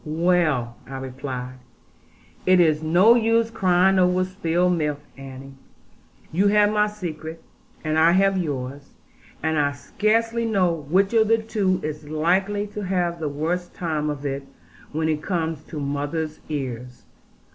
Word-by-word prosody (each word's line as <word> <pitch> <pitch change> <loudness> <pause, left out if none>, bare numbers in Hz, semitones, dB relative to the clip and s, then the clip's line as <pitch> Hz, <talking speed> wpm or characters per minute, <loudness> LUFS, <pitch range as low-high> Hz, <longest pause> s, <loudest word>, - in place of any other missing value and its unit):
'Well,' 155 -7 +1
I 135 0 -6
replied, 130 -1 -6 0.9
'it 185 0 +6
is 155 -3 +3
no 175 +8 +5
use 230 -1 +2
crying 185 -1 +3
over 180 0 +3
spilt 180 -1 0
milk 150 -4 -1 0.2
Annie. 135 0 -10 0.8
You 190 +5 +2
have 205 0 +4
my 210 0 +3
secret, 165 -5 -7 0.4
and 155 0 +1
I 165 +2 +5
have 195 +1 +3
yours; 140 -5 -4 0.5
and 160 -1 +1
I 145 -1 +1
scarcely 225 +9 0
know 195 -6 +2 0.2
which 195 +5 +3
of 220 -1 +4
the 225 +1 +4
two 210 -4 0
is 150 -1 -5
likely 190 +6 +1
to 210 - -4
have 180 -3 -1
the 155 -2 -2
worst 170 +5 -3
time 155 -3 -2
of 145 -1 -5
it, 135 0 -2 0.5
when 160 +1 -1
it 155 -1 0
comes 160 -4 -2
to 155 - -7
mother's 145 +2 -3
ears. 125 -4 -5
165 Hz, 145 wpm, -23 LUFS, 145-190 Hz, 0.9 s, it